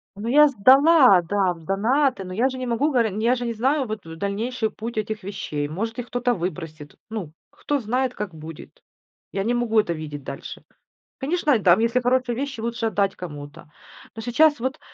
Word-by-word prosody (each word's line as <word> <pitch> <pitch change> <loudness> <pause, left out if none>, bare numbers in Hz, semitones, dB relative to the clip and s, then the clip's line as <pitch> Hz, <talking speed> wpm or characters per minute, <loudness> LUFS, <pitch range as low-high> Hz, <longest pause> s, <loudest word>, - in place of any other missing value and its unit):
Ну, 205 +3 -6
я 300 +5 +6
сдала, 265 - +6
да, 185 +1 0
в 165 - -15
донаты, 225 - +1
но 185 - -7
я 240 +7 +2
же 260 - -6
не 255 - -4
могу 255 +6 +1
горе 230 -7 +1
я 240 +3 +3
же 245 -1 -4
не 230 - -2
знаю, 265 +4 0
вот, 215 0 -5
дальнейший 200 +8 -3
путь 230 +2 -7
этих 215 -1 -3
вещей. 150 -7 -4
Может, 225 +9 -4
их 245 - -5
кто-то 245 0 0
выбросит. 165 -5 -6
Ну, 200 -9 -5 0.2
кто 290 -1 -2
знает, 250 +2 -1
как 210 -6 -5
будет? 155 0 -11 0.5
Я 195 0 -2
не 240 - +1
могу 235 -2 +2
это 175 -5 0
видеть 150 -3 -7
дальше. 140 0 -8 0.5
Конечно, 295 -1 +1
там, 185 0 +5
если 230 +2 +2
хорошие 250 0 +1
вещи, 270 -2 -4
лучше 235 0 -3
отдать 200 -3 0
кому-то. 145 -4 -9 0.5
Но 225 - -6
сейчас 255 +4 +3
вот 265 +4 -2
225 Hz, 190 wpm, -23 LUFS, 185-255 Hz, 0.5 s, я